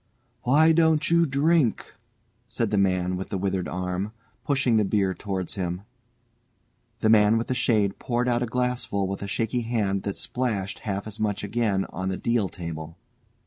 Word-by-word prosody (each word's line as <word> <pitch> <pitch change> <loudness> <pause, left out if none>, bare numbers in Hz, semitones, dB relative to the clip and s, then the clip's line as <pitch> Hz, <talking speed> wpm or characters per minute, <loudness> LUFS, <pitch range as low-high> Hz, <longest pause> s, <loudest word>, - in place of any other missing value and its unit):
"Why 155 +6 +5
don't 160 -1 +3
you 170 0 +4
drink?" 140 -1 +1 0.5
said - - -2
the 105 - +2
man 90 -1 +1
with 95 - -5
the 100 - -2
withered 95 -1 -1
arm, 90 +3 -3 0.3
pushing 130 -5 +2
the 105 - +4
beer 95 -1 +1
towards 95 0 -3
him. 90 -1 -3 1.2
The 110 - +3
man 105 0 +5
with 115 - -1
the - - -1
shade 110 -6 +1
poured 120 0 -1
out 120 -1 +1
a 125 - 0
glassful 125 -5 -1
with 95 +1 -4
a 100 - -4
shaky 115 +4 -1
hand 105 -4 0
that 100 - -3
splashed 110 -6 -2
half 100 0 -2
as 110 0 -7
much 105 -2 -1
again 105 -2 0
on 95 0 -3
the 95 - -2
deal 115 -5 0
table. 80 -2 -7
105 Hz, 175 wpm, -25 LUFS, 95-125 Hz, 1.2 s, Why